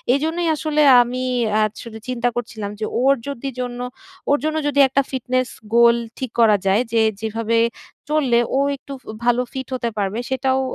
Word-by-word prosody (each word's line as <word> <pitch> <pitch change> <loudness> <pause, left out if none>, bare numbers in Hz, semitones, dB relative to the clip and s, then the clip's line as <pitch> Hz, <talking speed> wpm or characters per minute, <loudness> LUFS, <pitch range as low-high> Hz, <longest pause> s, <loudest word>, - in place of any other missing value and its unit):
এজন্যই 325 +4 -1
আসলে 305 0 0 0.2
আমি 250 +1 -4 0.3
অ্যা 215 +1 +2 0.2
আসলে 230 -2 -9
চিন্তা 245 -1 0
করছিলাম 220 -4 -4
যে 220 - -1 0.2
ওর 270 +2 +5
যদি 275 -1 -4
জন্য 245 -1 -4 0.5
ওর 285 - +4
জন্য 310 0 0
যদি 285 -1 +1
একটা 270 +1 +2
fitness 255 -1 -1 0.3
goal 235 0 +6 0.2
ঠিক 260 -3 -4
করা 220 -3 +6
যায় 195 +4 +3
যে 230 -1 +3 0.2
যেভাবে 225 +1 -1 0.5
চললে 275 -6 +2 0.2
ও - - +3 0.2
একটু 275 +1 -10
ফু - - -27 0.2
ভালো 245 0 +3
fit 265 -2 -5
হতে 240 -2 -2
পারবে, 205 +2 -1
সেটাও 265 0 +1
250 Hz, 175 wpm, -21 LUFS, 230-275 Hz, 0.5 s, goal